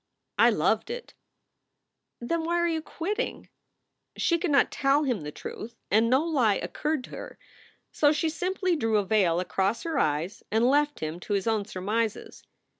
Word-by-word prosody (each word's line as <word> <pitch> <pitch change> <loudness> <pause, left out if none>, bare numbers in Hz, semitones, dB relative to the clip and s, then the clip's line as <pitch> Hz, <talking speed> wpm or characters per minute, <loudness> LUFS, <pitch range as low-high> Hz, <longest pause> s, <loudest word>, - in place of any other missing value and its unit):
"I - - +7
loved - - +1
it." 480 0 -6 1.1
"Then 325 +8 -2
why 340 +1 0
are 345 0 +2
you 325 -1 -1
quitting?" 335 +6 -4 0.7
She 340 -1 +2
could 350 - -1
not 280 -1 +4
tell 280 +2 +2
him 250 - -1
the 150 0 -6
truth 230 +9 -8 0.2
and 220 +3 +4
no 260 +4 +4
lie 255 -11 +2
occurred 300 +4 -2
to - - -11
her, - - -8 0.5
so 290 -1 +3
she 310 +2 0
simply 365 +2 -1
drew 225 -7 +1
a 205 - +1
veil 185 -5 +2
across 195 +4 -1
her 330 -1 -1
eyes 155 +6 -1
and 220 +2 +2
left 290 +2 +2
him 155 +2 -4
to 205 - -4
his 200 -1 0
own 220 -3 +1
surmises. 215 +3 -3
250 Hz, 175 wpm, -27 LUFS, 205-320 Hz, 1.1 s, I